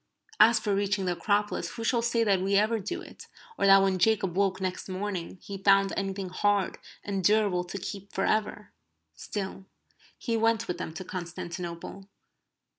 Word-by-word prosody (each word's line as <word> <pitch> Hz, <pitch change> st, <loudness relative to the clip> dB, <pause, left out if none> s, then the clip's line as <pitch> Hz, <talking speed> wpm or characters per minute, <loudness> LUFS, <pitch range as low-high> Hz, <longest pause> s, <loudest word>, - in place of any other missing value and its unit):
As 225 Hz, +2 st, +7 dB
for 210 Hz, -2 st, -1 dB
reaching 195 Hz, -1 st, 0 dB
the 180 Hz, -, +1 dB
Acropolis 205 Hz, +3 st, -1 dB
who 230 Hz, -, -5 dB
shall 235 Hz, +1 st, +2 dB
say 235 Hz, 0 st, +1 dB
that 200 Hz, -4 st, +2 dB
we 195 Hz, +1 st, +1 dB
ever 215 Hz, +3 st, +3 dB
do 205 Hz, +2 st, -5 dB
it, -, -, -13 dB, 0.3 s
or 200 Hz, -, +1 dB
that 195 Hz, 0 st, +8 dB
when 190 Hz, -1 st, +1 dB
Jacob 195 Hz, -2 st, +2 dB
woke 195 Hz, -1 st, +1 dB
next 185 Hz, 0 st, -4 dB
morning 185 Hz, -2 st, -4 dB
he 195 Hz, -1 st, -7 dB
found 195 Hz, 0 st, +4 dB
anything 195 Hz, -1 st, -3 dB
hard 200 Hz, +1 st, 0 dB, 0.2 s
and 195 Hz, -2 st, -3 dB
durable 205 Hz, -2 st, +3 dB
to 180 Hz, -, -6 dB
keep 200 Hz, +1 st, -7 dB
for 195 Hz, -, -1 dB
ever? 210 Hz, -1 st, -1 dB, 0.4 s
Still, 190 Hz, -, -6 dB, 0.5 s
he 230 Hz, -, -2 dB
went 225 Hz, 0 st, +2 dB
with 180 Hz, 0 st, -3 dB
them 170 Hz, -, -4 dB
to 190 Hz, -, -5 dB
Constantinople. 175 Hz, +1 st, -6 dB
195 Hz, 175 wpm, -28 LUFS, 185-210 Hz, 0.5 s, that